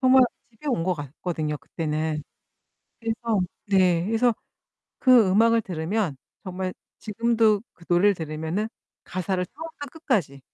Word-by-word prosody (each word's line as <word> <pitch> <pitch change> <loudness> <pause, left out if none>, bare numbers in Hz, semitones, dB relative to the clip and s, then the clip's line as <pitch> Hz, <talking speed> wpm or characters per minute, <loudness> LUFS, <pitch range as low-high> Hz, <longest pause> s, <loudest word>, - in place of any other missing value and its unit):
정말 260 0 +7 0.3
집에 230 +6 -14
온 235 -11 +1
것 185 0 +1
같거든요 150 +1 -3
그때는. 155 -1 -2 0.8
그래서 225 -1 -1 0.3
네 180 -3 +3
그래서 225 +3 +3 0.7
그 250 -6 +6
음악을 230 +4 +5
들으면 180 -2 -2 0.3
정말 185 0 -3 0.3
지금도 225 -1 +2
그 170 - -18
노래를 185 +4 +4
들으면은 160 +5 -3 0.4
가사를 185 0 -2
처음부터 320 - -8
끝까지 205 - -1
195 Hz, 285 characters per minute, -25 LUFS, 165-230 Hz, 0.8 s, 정말